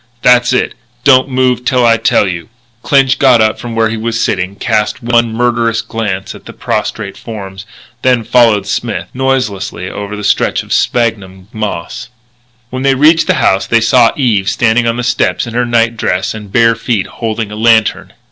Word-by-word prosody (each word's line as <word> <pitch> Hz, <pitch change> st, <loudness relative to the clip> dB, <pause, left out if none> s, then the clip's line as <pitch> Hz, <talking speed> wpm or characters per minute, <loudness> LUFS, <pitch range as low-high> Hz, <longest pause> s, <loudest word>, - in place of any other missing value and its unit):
That's 125 Hz, 0 st, +4 dB
it. 125 Hz, -, 0 dB, 0.3 s
Don't 135 Hz, -1 st, +4 dB
move 125 Hz, -1 st, 0 dB
till 125 Hz, -1 st, +1 dB
I 115 Hz, -1 st, +4 dB
tell 100 Hz, -, +2 dB
you 85 Hz, -2 st, -4 dB
to." -, -, -31 dB, 0.3 s
Clinch 135 Hz, -2 st, +2 dB
got 130 Hz, -4 st, +5 dB
up 110 Hz, 0 st, +1 dB
from 120 Hz, -1 st, -6 dB
where 115 Hz, -1 st, +1 dB
he 115 Hz, -, -3 dB
was 115 Hz, +1 st, -3 dB
sitting, 95 Hz, -2 st, -1 dB
cast 110 Hz, +2 st, -1 dB
one 120 Hz, -1 st, +1 dB
murderous 115 Hz, -1 st, 0 dB
glance 100 Hz, -4 st, -4 dB
at -, -, -14 dB
the -, -, -10 dB
prostrate 100 Hz, -3 st, -3 dB
forms, 100 Hz, -3 st, -9 dB, 0.3 s
then 125 Hz, -3 st, +2 dB
followed 115 Hz, -3 st, +3 dB
Smith, -, -, -3 dB
noiselessly, 105 Hz, -9 st, -2 dB
over 105 Hz, 0 st, -6 dB
the 105 Hz, -, -7 dB
stretch 100 Hz, -, +1 dB
of -, -, -5 dB
sphagnum 100 Hz, -5 st, -1 dB
moss. 105 Hz, -3 st, -5 dB, 0.6 s
When 130 Hz, 0 st, -4 dB
they 135 Hz, 0 st, +2 dB
reached 155 Hz, +4 st, +4 dB
the 185 Hz, -, +2 dB
house 95 Hz, -8 st, +1 dB
they 115 Hz, -, +3 dB
saw 115 Hz, +1 st, +4 dB
Eve 110 Hz, -8 st, +1 dB
standing 120 Hz, 0 st, +1 dB
on 115 Hz, +1 st, -1 dB
the 125 Hz, -, -3 dB
steps 125 Hz, -, 0 dB
in 120 Hz, -, -8 dB
her 120 Hz, 0 st, 0 dB
night 115 Hz, -1 st, +1 dB
dress 95 Hz, -3 st, -1 dB
and 105 Hz, -2 st, -10 dB
bare 115 Hz, +1 st, +4 dB
feet, 115 Hz, -3 st, -2 dB
holding 110 Hz, -2 st, -4 dB
a -, -, -6 dB
lantern. 110 Hz, 0 st, +1 dB
115 Hz, 185 wpm, -12 LUFS, 105-125 Hz, 0.6 s, got